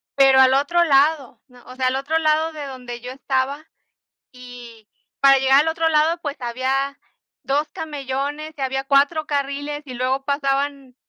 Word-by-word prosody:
pero 270 Hz, -1 st, +5 dB
al 260 Hz, 0 st, +5 dB
otro 320 Hz, +6 st, +2 dB
lado 280 Hz, -4 st, +2 dB, 0.2 s
o 255 Hz, -, -12 dB
sea, 260 Hz, 0 st, 0 dB
al 255 Hz, -, 0 dB
otro 280 Hz, +4 st, -1 dB
lado 315 Hz, 0 st, +1 dB
de 295 Hz, -2 st, -7 dB
donde 250 Hz, -3 st, -8 dB
yo 250 Hz, +1 st, -7 dB
estaba, 270 Hz, +3 st, -2 dB, 0.7 s
y 245 Hz, -3 st, -13 dB, 0.3 s
para 275 Hz, 0 st, +6 dB
llegar 265 Hz, +1 st, +4 dB
al 315 Hz, -, -2 dB
otro 325 Hz, 0 st, 0 dB
lado, 315 Hz, +2 st, +2 dB
pues 290 Hz, -2 st, -5 dB
había 265 Hz, +3 st, -2 dB, 0.5 s
2 290 Hz, +3 st, 0 dB
camellones 290 Hz, +1 st, -5 dB
y 275 Hz, -, -8 dB
había 270 Hz, 0 st, -2 dB
4 285 Hz, +3 st, +2 dB
carriles 285 Hz, +1 st, -3 dB
y 260 Hz, -, -8 dB
luego 260 Hz, +2 st, -1 dB
pasaban 275 Hz, -2 st, -2 dB
275 Hz, 160 wpm, -21 LUFS, 260-295 Hz, 0.7 s, para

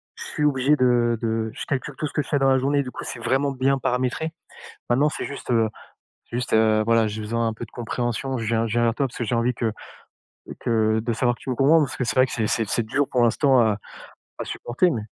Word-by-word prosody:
je -, -, -8 dB
suis 150 Hz, -, -4 dB
obligé 140 Hz, 0 st, +3 dB
de 120 Hz, -2 st, +3 dB
de 110 Hz, -1 st, -1 dB
je 135 Hz, -, -6 dB
calcule 140 Hz, +1 st, -3 dB
tout 155 Hz, -, -2 dB
ce -, -, -11 dB
que -, -, +1 dB
je 135 Hz, -, -9 dB
fais 145 Hz, -, +2 dB
dans 135 Hz, 0 st, +3 dB
la 130 Hz, 0 st, +4 dB
journée, 140 Hz, +2 st, +1 dB
du 130 Hz, -, -7 dB
coup -, -, -7 dB
c'est -, -, -6 dB
vraiment 140 Hz, +2 st, +1 dB
bien 135 Hz, +1 st, +1 dB
paramétré. 130 Hz, +5 st, -1 dB, 0.6 s
Maintenant 135 Hz, +5 st, +3 dB
c'est -, -, -5 dB
juste, 140 Hz, -, -6 dB
heu, 115 Hz, -2 st, +3 dB, 0.6 s
juste, 120 Hz, +1 st, -3 dB
heu, 110 Hz, -1 st, +4 dB
voilà, 115 Hz, -1 st, +3 dB
j'ai 105 Hz, +1 st, -5 dB
besoin 115 Hz, +2 st, -1 dB
d'un 115 Hz, -, -1 dB
peu 110 Hz, -, -7 dB
de 110 Hz, -, -22 dB
compréhension, 120 Hz, +2 st, -3 dB
je 115 Hz, -, -3 dB
viens 115 Hz, +1 st, +1 dB
je 110 Hz, -, -4 dB
viens 120 Hz, 0 st, +2 dB
vers 115 Hz, -1 st, +2 dB
toi 140 Hz, 0 st, 0 dB
parce 125 Hz, -, -12 dB
que -, -, -2 dB
j'ai 115 Hz, +1 st, -1 dB
envie 120 Hz, +2 st, +1 dB
que 115 Hz, -1 st, -1 dB, 0.9 s
que 110 Hz, -1 st, +2 dB
de 115 Hz, +1 st, -2 dB
savoir 120 Hz, +1 st, +1 dB
que -, -, -22 dB
tu -, -, -7 dB
me 130 Hz, -, 0 dB
comprends, 145 Hz, +6 st, +5 dB
parce 145 Hz, -, -2 dB
que -, -, -1 dB
c'est 110 Hz, -, -2 dB
vrai 130 Hz, -, +6 dB
que 130 Hz, -, -9 dB
c'est 110 Hz, -2 st, -1 dB
c'est 115 Hz, 0 st, 0 dB
c'est 115 Hz, -, 0 dB
dur 135 Hz, +6 st, 0 dB
pour 125 Hz, -2 st, +2 dB
l'instant 130 Hz, +3 st, +4 dB
à 110 Hz, -3 st, +3 dB, 0.6 s
à -, -, -3 dB
supporter 125 Hz, +10 st, 0 dB
mais 115 Hz, -7 st, -3 dB
120 Hz, 265 wpm, -23 LUFS, 115-135 Hz, 0.9 s, vrai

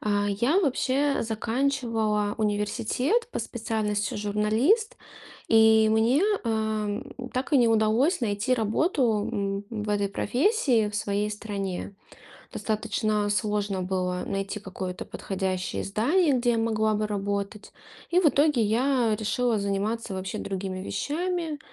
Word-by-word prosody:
А, 205 Hz, -1 st, 0 dB
я 240 Hz, -, +2 dB
вообще 275 Hz, -2 st, +1 dB
заканчивала 225 Hz, -2 st, 0 dB
университет 220 Hz, -, 0 dB
по -, -, -2 dB
специальности 215 Hz, -3 st, -2 dB
"журналист" 215 Hz, -, +1 dB, 0.5 s
и 220 Hz, -1 st, +6 dB
мне, 230 Hz, -, +3 dB, 0.2 s
э, 220 Hz, -1 st, -1 dB, 0.3 s
так 255 Hz, +4 st, -2 dB
и 285 Hz, -, +6 dB
не 240 Hz, -2 st, +4 dB
удалось 225 Hz, -, +2 dB
найти 220 Hz, +2 st, 0 dB
работу, 225 Hz, -, +1 dB
м, 200 Hz, 0 st, -2 dB
в 215 Hz, -2 st, -5 dB
этой 200 Hz, -1 st, +1 dB
профессии 250 Hz, -, +1 dB
в 205 Hz, -, -9 dB
своей 210 Hz, -1 st, -1 dB
стране. 200 Hz, -2 st, -5 dB, 0.6 s
Достаточно 215 Hz, -1 st, -1 dB
сложно 205 Hz, -2 st, -1 dB
было 180 Hz, -1 st, -2 dB
найти 195 Hz, +1 st, -3 dB
какое-то 185 Hz, -2 st, -6 dB
подходящее 185 Hz, -1 st, -3 dB
издание, 285 Hz, -, +2 dB
где 245 Hz, -1 st, +2 dB
я 230 Hz, -, 0 dB
могла 220 Hz, -1 st, +1 dB
бы 215 Hz, 0 st, 0 dB
работать. 200 Hz, 0 st, -3 dB, 0.4 s
И 360 Hz, +1 st, +4 dB
в 350 Hz, -, +3 dB
итоге 285 Hz, -4 st, +3 dB
я 235 Hz, +1 st, +2 dB
решила 230 Hz, +1 st, 0 dB
заниматься 200 Hz, +2 st, -2 dB
вообще 190 Hz, 0 st, -4 dB
другими 190 Hz, -1 st, -4 dB
вещами. 320 Hz, -, -2 dB
215 Hz, 125 wpm, -26 LUFS, 205-250 Hz, 0.6 s, и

